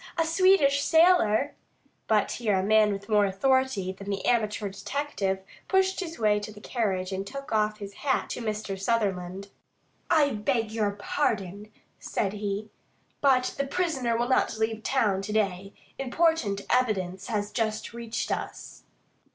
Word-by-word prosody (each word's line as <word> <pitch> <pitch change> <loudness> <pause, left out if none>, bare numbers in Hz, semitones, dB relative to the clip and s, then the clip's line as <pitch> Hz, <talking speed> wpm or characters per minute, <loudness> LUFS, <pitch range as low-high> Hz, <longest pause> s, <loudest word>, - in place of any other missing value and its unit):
A 330 - +2
Swedish 325 -5 +4
sailor 320 -7 +4 0.3
" - - -40
But 215 -2 +2
here 215 -5 0
a 185 - 0
man 215 +1 +4
with 200 0 -5
more 210 -2 +4
authority 245 -1 +1
than 195 +1 -9
the 195 -1 -3
amateur 215 -3 +1
detective 195 -2 -3 0.2
pushed 380 0 +2
his 330 -3 -5
way 210 -2 +3
to 210 +1 -7
the 210 - -12
carriage 200 -5 -2
and 190 0 -2
took 275 +4 -7
off 215 -1 +1
his 200 -1 -8
hat 270 -2 +1
to - - -4
Mr. 210 -3 -3
Sutherland. 195 -3 -1 0.6
"I 290 -3 +4
beg 225 0 -1
your 220 -2 0
pardon," 205 -2 -2 0.3
said 195 -2 -2
he, 210 0 -4 0.5
"but 260 -3 +3
the 280 - 0
prisoner 270 -9 0
will 240 +1 0
not 260 - +2
leave 220 0 -1
town 215 -6 +1
to 210 +2 -5
day. 195 -2 0 0.3
Important 270 -7 +1
evidence 195 -7 0
has 210 -3 -2
just 220 -1 -2
reached 235 -1 -4
us." - - -5
215 Hz, 155 wpm, -27 LUFS, 200-265 Hz, 0.6 s, Swedish